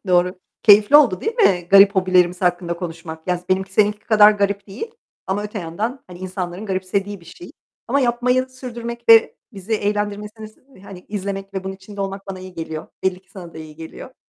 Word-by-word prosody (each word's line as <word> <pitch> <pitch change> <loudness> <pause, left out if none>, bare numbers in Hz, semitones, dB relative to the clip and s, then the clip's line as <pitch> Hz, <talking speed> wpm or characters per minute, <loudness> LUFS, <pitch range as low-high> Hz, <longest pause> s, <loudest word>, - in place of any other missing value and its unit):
doğru. 180 +1 +2 0.2
Keyifli 210 +6 +7
oldu 245 -11 +4
değil 445 +2 -2
mi 185 - +3
garip 200 +1 +7
hobilerimiz 180 -1 +2
hakkında 175 -1 0
konuşmak? 165 -2 -8
Ya 180 - +2
z 180 - -21
benimki 190 +1 0
seninki 210 +1 +2
kadar 215 -1 +6
garip 200 -1 -1
değil 235 - -7 0.4
ama 200 +2 -1
öte 210 +1 -5
yandan, 210 +10 -4
hani, 180 -1 -12
insanların 185 +1 -5
garipsediği 195 +1 -2
bir - - -18
şey. 170 +1 -12 0.4
Ama 280 +3 +2
yapmayı 250 +1 +1
sürdürmek 235 -2 -8
ve 225 -1 +6 0.2
bizi 195 +2 -7
eğlendirmesini, 210 +2 -4
hani 185 -2 -11
izlemek 195 -1 -5
ve 190 - -4
bunun 190 0 -4
içinde 200 +1 -11
olmak 195 0 -5
bana 190 -1 -6
iyi 185 -1 -11
geliyor. 160 -1 -6 0.2
Belli 185 -1 -1
ki 185 - -33
sana 175 -4 -11
da - - -8
iyi 155 -1 -11
geliyor. 165 +10 -10
195 Hz, 190 wpm, -20 LUFS, 180-215 Hz, 0.4 s, Keyifli